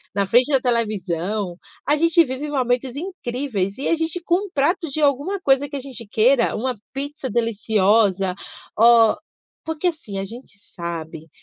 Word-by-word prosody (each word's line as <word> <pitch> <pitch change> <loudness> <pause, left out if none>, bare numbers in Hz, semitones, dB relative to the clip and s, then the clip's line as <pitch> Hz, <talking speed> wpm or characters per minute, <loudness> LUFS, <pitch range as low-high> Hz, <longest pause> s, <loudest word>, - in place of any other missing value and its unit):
na 200 -1 +2
frente 245 +8 +3
da 270 - +4
televisão, 205 -5 -1 0.3
a 295 - +3
gente 335 +2 +4
vive 270 +2 -4
momentos 255 -1 -1
incríveis. 250 - -3
E 275 - -3
a 335 - +3
gente 325 +2 -1
com 370 +4 0
um - - -16
prato, 330 +3 0
de 305 +3 -2
alguma 290 +8 +1
coisa 275 -2 +2
que 290 - -7
a - - -2
gente 250 -5 -6
queira, 235 +4 +3
uma 255 +3 -1 0.2
pizza 280 0 -3
deliciosa, 210 -4 +2 0.4
ó, 230 0 +6 0.5
porque, 320 +2 -2
assim, 300 - -4
a 195 - -2
gente 230 0 -9
sabe 165 -4 -7
250 Hz, 165 wpm, -21 LUFS, 205-290 Hz, 0.5 s, ó